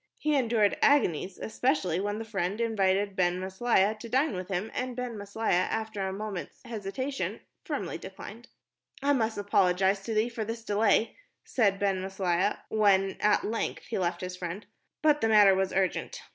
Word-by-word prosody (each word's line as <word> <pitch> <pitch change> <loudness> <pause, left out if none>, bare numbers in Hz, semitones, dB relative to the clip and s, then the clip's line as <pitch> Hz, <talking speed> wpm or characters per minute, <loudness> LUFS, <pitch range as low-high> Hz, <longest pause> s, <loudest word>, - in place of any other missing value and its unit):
He 305 -1 0
endured 230 -6 +2
agonies, 190 - +3
especially 220 - 0
when 205 +1 -2
the 225 - -5
friend 200 -1 -2
invited 200 -3 +1
Ben 180 -1 +1
Maslia 190 +2 +1
to 230 - -8
dine 265 -1 +1
with 180 0 -5
him, 190 +3 -3
and 255 -1 -3
Ben 250 -2 -4
Maslia, 200 -2 0
after 220 -2 -3
a 190 - -1
few 190 - -5
moment's 210 -4 -6
hesitation, 235 +5 -4 0.3
firmly - - -3
declined. - - -10 0.6
"I 285 +1 +4
must 225 -5 0
apologize 195 -1 +2
to 225 - -3
thee 215 +2 +3
for 230 -2 -4
this 225 +1 -5
delay," 210 +1 +2 0.3
said 200 -6 +2
Ben 195 -2 0
Maslia, 190 0 0
when 195 -3 +3
at 210 0 +3
length 225 +2 -2
he 225 - -3
left 175 -1 -1
his 180 0 -5
friend, 180 +3 -6 0.4
"but 300 -1 +4
the 225 - +2
matter 205 -3 +7
was 190 0 0
urgent. 195 - -1
205 Hz, 170 wpm, -28 LUFS, 190-225 Hz, 0.6 s, matter